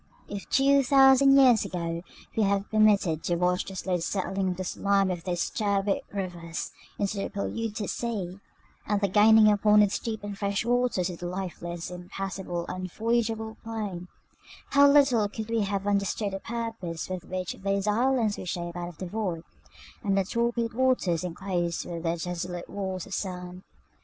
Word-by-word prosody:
If, 200 Hz, -1 st, -7 dB
two 275 Hz, +1 st, +4 dB
thousand 270 Hz, +1 st, +6 dB
years 250 Hz, -5 st, +6 dB
ago, 170 Hz, -1 st, -3 dB, 0.3 s
we 225 Hz, -, +2 dB
had 200 Hz, -1 st, +1 dB
been 215 Hz, -, +1 dB
permitted 195 Hz, -7 st, +4 dB
to 175 Hz, -, +1 dB
watch 180 Hz, +1 st, +1 dB
the 195 Hz, -, -8 dB
slow 185 Hz, -1 st, -1 dB
settling 190 Hz, +2 st, -1 dB
of 180 Hz, -, -3 dB
the 185 Hz, -, -3 dB
slime 195 Hz, +1 st, +1 dB
of 175 Hz, -2 st, -5 dB
those 175 Hz, -2 st, -1 dB
turbid 200 Hz, -2 st, 0 dB
rivers 175 Hz, -4 st, -4 dB, 0.3 s
into 200 Hz, 0 st, -1 dB
the 195 Hz, -, -2 dB
polluted 215 Hz, +1 st, -3 dB
sea, 200 Hz, -6 st, -3 dB, 0.5 s
and 210 Hz, -1 st, +1 dB
the 200 Hz, -, +1 dB
gaining 215 Hz, +3 st, +6 dB
upon 210 Hz, 0 st, +5 dB
its 205 Hz, -, 0 dB
deep 220 Hz, -2 st, -4 dB
and 205 Hz, -1 st, -5 dB
fresh 200 Hz, +1 st, -1 dB
waters 240 Hz, -7 st, +1 dB
of 170 Hz, -, -9 dB
the 175 Hz, -, -4 dB
lifeless, 175 Hz, -2 st, -5 dB
impassable, 180 Hz, -1 st, -5 dB
unvoyageable 220 Hz, +4 st, -2 dB
plain, 210 Hz, -6 st, -5 dB, 0.6 s
how 280 Hz, 0 st, +7 dB
little 265 Hz, -7 st, +4 dB
could 220 Hz, +2 st, -6 dB
we 230 Hz, -1 st, +2 dB
have 200 Hz, -1 st, -1 dB
understood 200 Hz, 0 st, 0 dB
the 195 Hz, -, -3 dB
purpose 225 Hz, -8 st, -4 dB
with 185 Hz, -2 st, -5 dB
which 185 Hz, -1 st, -4 dB
those 195 Hz, 0 st, 0 dB
islands 230 Hz, 0 st, +1 dB
were -, -, -6 dB
shaped 175 Hz, 0 st, -4 dB
out 175 Hz, 0 st, -4 dB
of 170 Hz, -, -14 dB
the 185 Hz, -, -5 dB
void, 180 Hz, -4 st, -3 dB, 0.6 s
and 195 Hz, -2 st, +1 dB
the 195 Hz, -, +3 dB
torpid 235 Hz, +2 st, -1 dB
waters 235 Hz, -9 st, +1 dB
enclosed 175 Hz, -1 st, -2 dB
with 170 Hz, -1 st, -5 dB
their 165 Hz, 0 st, -1 dB
desolate 175 Hz, +1 st, -4 dB
walls 190 Hz, -3 st, -4 dB
of 195 Hz, -, -9 dB
sand! 180 Hz, -2 st, -5 dB
195 Hz, 170 wpm, -27 LUFS, 180-220 Hz, 0.6 s, how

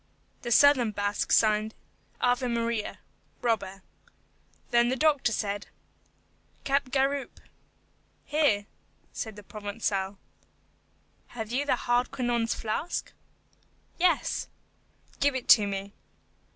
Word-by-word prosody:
The 240 Hz, -, -4 dB
southern 260 Hz, -2 st, +6 dB
Basque 205 Hz, 0 st, -2 dB
signed, 215 Hz, 0 st, +3 dB, 0.5 s
AVE 250 Hz, +1 st, +2 dB
MARIA: 230 Hz, -2 st, -1 dB, 0.5 s
Robber. 195 Hz, -5 st, -1 dB, 0.9 s
Then 240 Hz, 0 st, +4 dB
the 260 Hz, -, +1 dB
doctor 290 Hz, -3 st, +2 dB
said, 205 Hz, -2 st, -2 dB, 1.0 s
"Capgaroupe." 275 Hz, 0 st, 0 dB, 0.9 s
"Here," 290 Hz, -10 st, +2 dB, 0.5 s
said 220 Hz, -2 st, -5 dB
the 210 Hz, -, -11 dB
Provençal. 205 Hz, -1 st, -3 dB, 1.2 s
"Have 220 Hz, -1 st, -4 dB
you 280 Hz, +4 st, -1 dB
Hardquanonne's 240 Hz, -2 st, 0 dB
flask?" 225 Hz, +10 st, -3 dB, 0.9 s
"Yes." 350 Hz, -1 st, +1 dB, 0.7 s
"Give 285 Hz, -1 st, +2 dB
it 260 Hz, -, +7 dB
me." 200 Hz, -1 st, -3 dB
235 Hz, 85 wpm, -28 LUFS, 210-260 Hz, 1.2 s, it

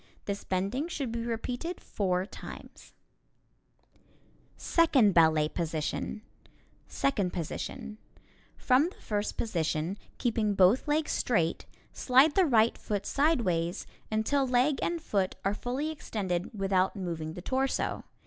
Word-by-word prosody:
This 200 Hz, 0 st, -3 dB
bending 200 Hz, -, -1 dB
should 280 Hz, -8 st, -3 dB
be 230 Hz, 0 st, -3 dB
repeated 245 Hz, +9 st, -3 dB
four 185 Hz, -2 st, -1 dB
times. -, -, -11 dB, 1.6 s
[Illustration: -, -, -30 dB
Second 280 Hz, -, +4 dB
Ballet 160 Hz, -2 st, +5 dB
Position] 165 Hz, +6 st, -3 dB, 0.6 s
Second 205 Hz, -10 st, 0 dB
Position: 215 Hz, -, -5 dB, 0.6 s
From 270 Hz, +6 st, +3 dB
the -, -, -17 dB
first 210 Hz, -1 st, -3 dB
position, 170 Hz, -2 st, -1 dB, 0.2 s
keeping 220 Hz, -4 st, 0 dB
both 195 Hz, +9 st, +4 dB
legs 300 Hz, +1 st, +1 dB
straight, 170 Hz, -9 st, 0 dB, 0.3 s
slide 265 Hz, +4 st, +4 dB
the 380 Hz, +2 st, +4 dB
right 230 Hz, -3 st, +3 dB
foot 205 Hz, -2 st, -3 dB
sideways 205 Hz, -, +1 dB, 0.3 s
until 265 Hz, +6 st, +1 dB
leg 255 Hz, +3 st, +2 dB
and 340 Hz, 0 st, -1 dB
foot 200 Hz, -, -1 dB
are 195 Hz, -, +2 dB
fully 260 Hz, +8 st, -3 dB
extended 190 Hz, -, -3 dB
without 190 Hz, 0 st, +1 dB
moving 165 Hz, -5 st, -4 dB
the 180 Hz, -, -8 dB
torso. 265 Hz, +3 st, -1 dB
215 Hz, 120 wpm, -29 LUFS, 185-265 Hz, 1.6 s, Ballet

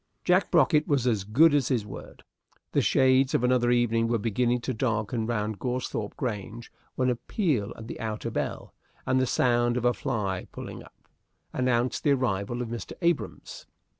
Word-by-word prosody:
Jack 185 Hz, +2 st, +3 dB
Brocket 155 Hz, -2 st, +3 dB
was 140 Hz, -4 st, +1 dB
as 110 Hz, -6 st, +1 dB
good 145 Hz, +10 st, +5 dB
as 140 Hz, -5 st, +2 dB
his 120 Hz, -6 st, 0 dB
word. 105 Hz, -, -10 dB, 0.5 s
The -, -, +2 dB
shades 130 Hz, 0 st, +3 dB
of -, -, +1 dB
another 125 Hz, -1 st, +3 dB
evening 115 Hz, -1 st, +2 dB
were 115 Hz, 0 st, +1 dB
beginning 120 Hz, +3 st, 0 dB
to 130 Hz, -, -2 dB
darken 110 Hz, -1 st, -1 dB
round 105 Hz, -3 st, -2 dB
Goresthorpe 125 Hz, -4 st, -3 dB
Grange, 115 Hz, 0 st, -5 dB, 0.2 s
when 130 Hz, -1 st, +1 dB
a -, -, 0 dB
peal 130 Hz, -, -1 dB
at 115 Hz, -, -9 dB
the -, -, -7 dB
outer 110 Hz, 0 st, -4 dB
bell, -, -, -4 dB, 0.3 s
and 130 Hz, 0 st, +2 dB
the 130 Hz, -, +1 dB
sound 120 Hz, 0 st, +2 dB
of 125 Hz, -, -2 dB
a 120 Hz, -, +4 dB
fly 100 Hz, -7 st, -3 dB
pulling -, -, -8 dB
up, -, -, -21 dB, 0.5 s
announced 125 Hz, -1 st, 0 dB
the 145 Hz, -, +4 dB
arrival 120 Hz, -2 st, -1 dB
of 115 Hz, -, -7 dB
Mr. 120 Hz, 0 st, -6 dB
Abrahams. 170 Hz, -3 st, -2 dB
120 Hz, 175 wpm, -27 LUFS, 110-130 Hz, 0.5 s, good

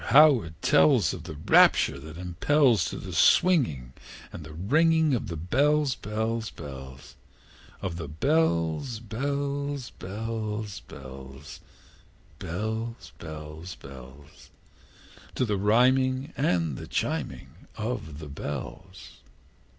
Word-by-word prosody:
how 145 Hz, -4 st, +7 dB
it 80 Hz, -1 st, -11 dB
tells 135 Hz, -, +4 dB
Of 85 Hz, -3 st, -8 dB
the 80 Hz, -3 st, -7 dB
rapture 70 Hz, -2 st, +4 dB
that 75 Hz, +3 st, -10 dB
impels 100 Hz, -, +2 dB
To -, -, -4 dB
the -, -, -7 dB
swinging 95 Hz, -, +3 dB, 0.4 s
and 80 Hz, -, -7 dB
the 75 Hz, -, -10 dB
ringing 155 Hz, -, +3 dB
Of 120 Hz, -, -1 dB
the 85 Hz, -, -4 dB
bells, 140 Hz, -, +2 dB
bells, 110 Hz, +1 st, -3 dB
bells, 65 Hz, -3 st, -10 dB, 0.7 s
Of 90 Hz, -3 st, -3 dB
the 85 Hz, -3 st, -5 dB
bells, 85 Hz, -, 0 dB
bells, 140 Hz, +3 st, -3 dB
bells, 105 Hz, +1 st, -5 dB
bells, 65 Hz, +3 st, -11 dB, 0.8 s
Bells, 110 Hz, +6 st, -4 dB
bells, 80 Hz, +2 st, -8 dB
bells 70 Hz, +2 st, -13 dB, 0.9 s
To 130 Hz, -, +1 dB
the 105 Hz, -3 st, 0 dB
rhyming 130 Hz, +6 st, +3 dB
and 85 Hz, -, 0 dB
the -, -, -8 dB
chiming 70 Hz, +7 st, -4 dB
of 105 Hz, -10 st, -4 dB
the 75 Hz, -1 st, -8 dB
bells! 75 Hz, +5 st, -7 dB
100 Hz, 110 wpm, -27 LUFS, 75-130 Hz, 0.9 s, how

